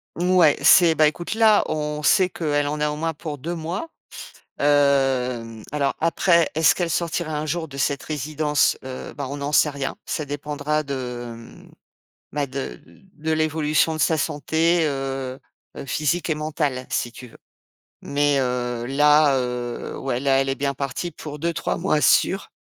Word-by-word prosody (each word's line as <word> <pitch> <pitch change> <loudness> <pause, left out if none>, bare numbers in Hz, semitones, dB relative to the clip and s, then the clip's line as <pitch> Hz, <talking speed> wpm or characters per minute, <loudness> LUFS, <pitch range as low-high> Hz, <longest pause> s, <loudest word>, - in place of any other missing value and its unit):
Ouais, 175 -3 +4
c'est 165 +1 +7
beh, 155 -1 +5
écoute 175 +7 -3
là, 220 -2 +5
on 150 -1 -3
sait 185 +5 +4
qu'elle 145 -4 -1
en 150 +1 -3
a 150 - +2
au 150 - -3
moins 165 +1 -2
pour 150 -1 -6
2 165 +6 -4
mois. 175 - -4 0.7
Hem, 130 -6 +1
alors 140 -2 0
après, 170 0 +3
est-ce 160 0 +5
qu'elle 175 -2 -1
sortira 165 -2 -2
un 150 - -3
jour 160 +1 -2
de 140 -1 -10
cette 140 -1 -1
résidence? 150 0 0
Heu, 130 -1 -7
bah, 140 -2 -5
on 145 - -5
n'en 140 +1 -3
sait 150 - +4
rien. 140 -1 -4
Ça 155 - -3
dépendra 150 +1 -2
de, 125 -4 -5
mmh, 115 0 -14 0.6
bah 145 -1 -1
de 130 - -6
de 85 - -20 0.2
de 160 - +1
l'évolution 155 0 +1
de 155 - -5
sa 160 0 +2
santé, 160 +4 +1
heu 135 -2 -3 0.4
heu, - - -6
physique 155 +5 -1
et - - +1
mentale, 150 -4 -2
si 120 - -1
tu 125 +1 -11
veux. - - -17 0.7
Mais 145 0 +1
heu 120 -2 -2
là, 145 +1 +4
heu 125 -1 -4
ouais, 130 -2 -2
là, 135 -1 +3
elle 135 - -1
est 135 - 0
bien 140 0 -1
partie 140 +6 -4
pour 150 -1 -8
2 170 +3 -1
ou - - -3
3 - - -2
mois 170 -4 +1
sûr 195 +5 +3
145 Hz, 180 wpm, -23 LUFS, 135-160 Hz, 0.7 s, c'est